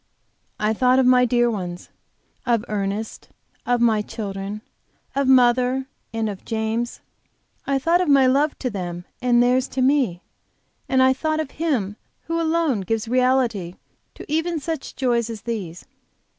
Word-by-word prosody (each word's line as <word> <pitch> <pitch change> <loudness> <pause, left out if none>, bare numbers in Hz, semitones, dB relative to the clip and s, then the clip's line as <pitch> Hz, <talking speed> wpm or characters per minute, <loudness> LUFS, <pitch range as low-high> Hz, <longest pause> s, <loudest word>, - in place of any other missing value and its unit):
I 215 +1 +1
thought 250 +3 +3
of 265 - +4
my 250 0 +5
dear 240 0 +2
ones, 180 -4 -5 0.5
of 235 -2 +1
Ernest, 205 +1 -4 0.4
of 245 0 +2
my 225 -3 +3
children, 205 -1 -5 0.5
of 275 -1 +1
mother, 255 0 +4 0.3
and 225 -1 -1
of 200 -3 -6
James, 225 +2 -2 0.7
and 275 - +1
I - - +3
thought 335 +6 +2
of 360 - 0
my 275 -2 +6
love 280 +4 +2
to 250 - -3
them 175 -3 -5 0.2
and 245 -1 +3
of - - +6
theirs 250 +2 +3
to 265 - -3
me. 255 -10 +2 0.7
And 260 -1 +4
I 260 0 +5
thought 310 +3 -1
of 310 -3 -3
Him 245 -11 -1 0.3
who 330 +1 -2
alone 320 -8 +1
gives 225 +4 -2
reality 245 -7 +1 0.4
to - - -10
even 320 +2 -1
such 315 0 -5
joys 235 -3 0
as 220 -3 -7
these. 195 -8 -5
245 Hz, 160 wpm, -22 LUFS, 215-265 Hz, 0.7 s, my